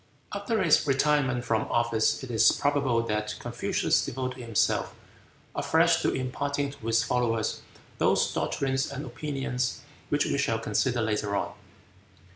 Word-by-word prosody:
After 205 +1 -1
his 155 -3 +4
retirement 135 -3 +2
from 110 -1 0
office 115 +1 +1
it 130 - -6
is 110 - +5
probable 140 -5 +1
that 105 -1 -2
Confucius - - 0
devoted 130 -1 -4
himself 115 -4 0 0.6
afresh - - +3
to - - +1
imparting 140 +2 -2
to 115 -5 -10
his 115 0 +3
followers 115 -3 0 0.4
those - - +2
doctrines 135 0 -1
and 140 +2 -5
opinions 130 -1 -3 0.3
which 145 0 +2
we 140 - 0
shall 115 -5 +1
consider 115 +2 0
later 105 -2 -1
on. - - -2
130 Hz, 135 wpm, -27 LUFS, 115-140 Hz, 0.6 s, is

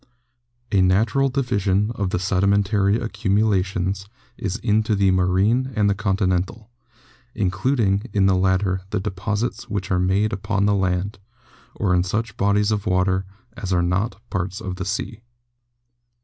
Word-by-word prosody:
A 100 - +4
natu 95 +4 +3
ral 135 0 +2
division 105 -6 0
of 100 -4 -2
the - - -1
sedimentary 100 +2 +2
accumulations 100 -3 0 0.3
is 105 -5 -3
into 110 -1 +1
the 100 -1 +3
marine 95 +8 +2
and 105 -1 +2
the 100 - +3
continental, 100 +2 -1 0.6
including 100 +2 0
in 100 -1 +2
the 95 - +4
latter 95 0 +1
the 105 - -1
deposits 105 +5 -3
which 100 -3 -3
are 90 - +2
made 100 +4 +1
upon 100 0 -1
the 105 - +3
land, 95 +2 -1 0.6
or 95 -5 0
in 90 - +4
such 110 +6 -2
bodies 100 +1 +2
of 105 -2 -1
water 95 +1 +1 0.3
as 95 -4 -5
are 90 -1 +2
not 95 +4 -1
parts 95 0 -2
of 90 -1 -5
the 95 - -4
sea. 105 +3 -4
100 Hz, 150 wpm, -22 LUFS, 95-105 Hz, 0.6 s, A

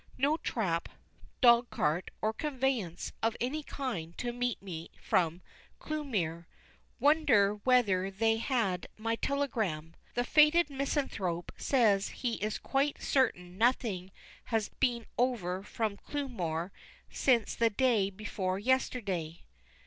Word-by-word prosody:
No 285 +4 +2
trap, 175 - -1 0.5
dog 240 -1 +6
cart, 155 +5 0
or 215 +1 +1
conveyance 260 - -2
of 225 0 0
any 270 +6 -1
kind 200 - -5
to 240 -1 -3
meet 245 -1 -1
me 170 -4 -7
from 170 0 +1 0.3
Clewmere. 200 - -3 0.5
Wonder 255 -10 +4
whether 205 -5 +3
they 225 +3 +1
had 225 -7 0
my 225 +1 -1
telegram. 220 - -1 0.2
The 245 - +1
Faded 300 +4 +5
Misanthrope 265 - -2
says 215 -7 +3
he 240 -3 -3
is 215 +1 -1
quite 280 +1 0
certain 180 -9 0
nothing 220 -6 +1 0.3
has 225 -3 0
been 240 -4 0
over 200 -8 0
from 210 0 -3
Clewmere 190 - -3 0.4
since 240 -5 +2
the 230 -1 +3
day 225 -3 +2
before 190 -2 -3
yesterday. 200 -8 -1
225 Hz, 120 wpm, -31 LUFS, 185-260 Hz, 0.5 s, dog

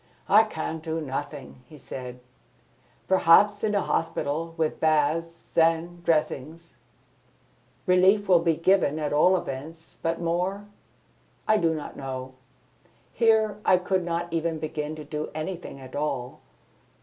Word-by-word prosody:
"I 215 +2 +6
can 160 -5 -4
do 160 0 -3
nothing," 140 -2 -6
he 155 - -13
said. 125 -2 -8 0.9
"Perhaps, 190 +3 +5
in 210 -1 +1
a 200 - +2
hospital, 165 0 -2
with 160 -1 -1
baths 160 +2 0
and 165 +1 +1
dressings! 160 0 -1 1.1
Relief 190 +3 +4
will 180 -2 +6
be 165 -1 +1
given 165 -3 +2
at 150 -2 -2
all 180 +5 +5
events; 160 +2 -8
but 165 0 -1
more? 180 +4 -1 0.8
I 215 - +4
do 165 -4 +1
not 150 - -7
know. 130 -1 -6 0.8
Here 220 -2 +2
I 185 - +5
could 185 0 -1
not 170 0 -3
even 165 0 -1
begin 155 0 -4
to 155 - -8
do 150 +1 -4
anything 160 -2 -5
at 130 -1 -11
all. 140 -4 -3
165 Hz, 135 wpm, -26 LUFS, 150-180 Hz, 1.1 s, I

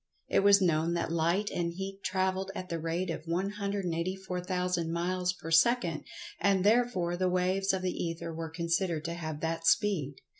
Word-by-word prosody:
It - - +3
was 200 0 +6
known 165 0 +2
that 170 -1 -1
Light 170 +5 +1
and 170 -1 -1
Heat 195 +2 -6
travelled 190 0 0
at 185 -2 -6
the 170 - -2
rate 165 +3 -2
of 155 - -6
184,000 180 -2 -2
miles 180 +2 0
per 165 -3 -8
second, 170 -2 +3 0.3
and 195 -2 +3
therefore 205 -6 +2
the 185 +1 +1
"waves" 185 +2 +1
of 190 -1 -2
the 185 - 0
Ether 165 -1 -4
were 165 0 -5
considered 170 0 -1
to 170 - -2
have 155 -3 -5
that 165 0 -1
speed. 150 -2 +2
180 Hz, 165 wpm, -30 LUFS, 165-190 Hz, 0.3 s, was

